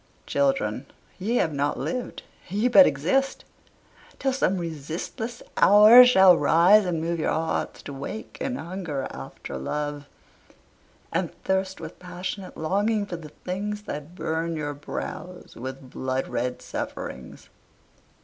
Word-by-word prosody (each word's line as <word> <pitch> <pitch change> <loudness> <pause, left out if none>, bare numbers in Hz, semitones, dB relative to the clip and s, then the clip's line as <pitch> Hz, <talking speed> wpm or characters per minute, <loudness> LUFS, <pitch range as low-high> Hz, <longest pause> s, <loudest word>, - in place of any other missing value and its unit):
Children, 275 -1 0 0.3
ye 215 +6 -1
have 160 -10 +1
not 145 +1 0
lived, 250 -1 -4 0.3
ye 205 +6 +1
but 275 +3 +8
exist 225 - 0 0.7
Till 270 -1 0
some 195 -8 +1
resistless 170 - -5
hour 215 +5 +9
shall 190 -7 +7
rise 175 +7 +5
and 175 -3 -1
move 165 +1 -2
Your 155 - 0
hearts 160 0 -2
to 140 - -7
wake 140 +11 -7
and 260 -1 -2
hunger 170 - -4
after 65 0 -8
love, 145 - -4 1.1
And - - -1
thirst 190 0 -1
with - - -9
passionate 180 +1 -6
longing 205 +6 0
for 185 - -6
the 155 -2 -10
things 205 +6 -5
That 150 0 -7
burn 165 -1 -2
your 145 -2 -3
brows 180 +5 -7
with 130 +1 -8
blood 130 0 -2
red 125 +1 -3
sufferings. - - -7
175 Hz, 130 wpm, -25 LUFS, 145-210 Hz, 1.1 s, hour